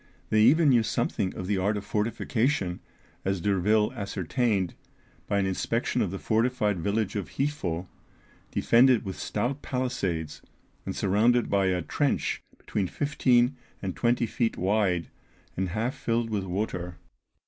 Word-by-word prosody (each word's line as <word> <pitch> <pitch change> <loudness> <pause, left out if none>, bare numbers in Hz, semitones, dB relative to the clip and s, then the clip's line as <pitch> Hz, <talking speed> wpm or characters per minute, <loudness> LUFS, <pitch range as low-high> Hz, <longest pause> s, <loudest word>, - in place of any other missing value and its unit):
They 110 - +4
even 145 +7 +6
knew 120 -3 +5
something 95 -3 -1
of 95 - -5
the 100 0 0
art 105 +3 +1
of 100 - -6
fortification, 110 -1 0 0.4
as 95 -1 0
D'Urville 105 +5 +2
ascertained 100 -2 -1 0.5
by 100 - +1
an 100 - +2
inspection 95 -1 0
of - - +1
the 95 - -4
fortified 110 -3 +1
village 100 +3 -1
of 100 -4 -3
Hifo, 100 - -1 0.6
defended 120 -1 +4
with 95 -1 -4
stout 125 +7 -2
palisades, 90 - -2 0.5
and - - -3
surrounded 115 +5 +2
by 100 -1 +3
a 90 -1 0
trench 145 -2 0 0.2
between 100 -3 -2
fifteen 130 0 +2 0.2
and 95 -2 -4
twenty 120 0 +2
feet 115 +1 -1
wide, 95 -3 +1 0.5
and 95 0 -1
half 110 +7 -1
filled 115 0 -1
with 100 -3 -1
water. 90 -2 -3
105 Hz, 140 wpm, -27 LUFS, 95-120 Hz, 0.6 s, even